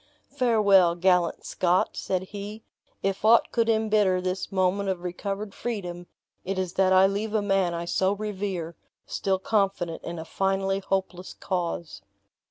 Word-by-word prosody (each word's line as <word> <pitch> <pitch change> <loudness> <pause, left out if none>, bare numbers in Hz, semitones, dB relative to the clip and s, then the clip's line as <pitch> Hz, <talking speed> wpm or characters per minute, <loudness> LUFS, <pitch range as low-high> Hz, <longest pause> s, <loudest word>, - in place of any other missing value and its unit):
"Farewell, 200 -8 +4
gallant 180 -1 +2
Scot," 180 0 +1
said 185 -1 -2
he, 205 +3 -8 0.4
"if 195 0 -1
aught 225 +1 +5
could 230 -1 +1
imbitter 215 -4 +2
this 185 +1 -3
moment 195 +1 +1
of 180 -2 -3
recovered 195 +3 -4
freedom, 180 -7 -5 0.4
it 195 +1 -3
is 185 -2 -2
that 190 -1 +3
I 190 0 +6
leave 205 +3 -1
a 215 - +3
man 195 -3 +1
I 170 0 -4
so 190 +3 +1
revere, 195 -5 -4 0.3
still 190 -1 -1
confident 195 -4 -1
in 170 0 -5
a 160 - -6
finally 195 +2 0
hopeless 190 -2 -3
cause!" 170 -3 -4
190 Hz, 150 wpm, -26 LUFS, 180-205 Hz, 0.4 s, I